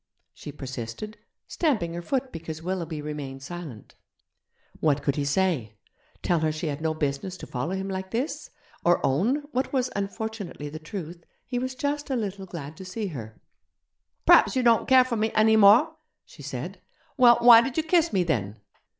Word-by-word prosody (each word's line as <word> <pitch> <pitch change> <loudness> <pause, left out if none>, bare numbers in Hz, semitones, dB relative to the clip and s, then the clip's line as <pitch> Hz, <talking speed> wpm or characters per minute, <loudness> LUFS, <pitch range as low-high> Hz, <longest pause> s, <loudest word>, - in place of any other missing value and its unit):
she 145 - -9
persisted, 135 - -7 0.3
stamping 220 - 0
her 170 - -4
foot 260 +7 -2
because 160 -1 -7
Willoughby 170 -4 -3
remained 140 -3 -6
silent. 155 -8 -9 0.9
What 145 -2 +1
could 140 - 0
he 145 - -1
say? 140 - 0 0.5
Tell 175 -2 +2
her 155 0 +1
she 155 +2 -5
had 150 -1 -3
no 160 0 -1
business 155 +5 -3
to - - -9
follow 145 +9 -3
him 190 0 -3
like 190 -1 -4
this; 245 +9 -3 0.3
or 175 0 +4
own, 220 - +1
what 260 0 -1
was, 255 -2 0
unfortunately, 200 -6 -4
the 155 +2 -8
truth, 170 0 -7 0.2
he 245 -1 -2
was 255 +1 -4
just 290 +2 -2
a 265 - 0
little 200 -4 -4
glad 160 -4 -8
to - - -9
see 195 +2 -4
her? 115 -8 -8 0.9
'Praps - - +6
you 255 - +1
don't 235 -1 +4
care 260 -1 +7
for 240 -2 -2
me 220 +1 0
any 220 0 +5
more?' 220 +10 +6 0.3
she - - -15
said. - - -6 0.3
'Well, 240 -2 +7
why 235 -1 +9
did 265 +3 -4
you 320 - +2
kiss 335 0 +2
me, 185 - +2
then?' 110 - -2
185 Hz, 180 wpm, -26 LUFS, 150-235 Hz, 0.9 s, why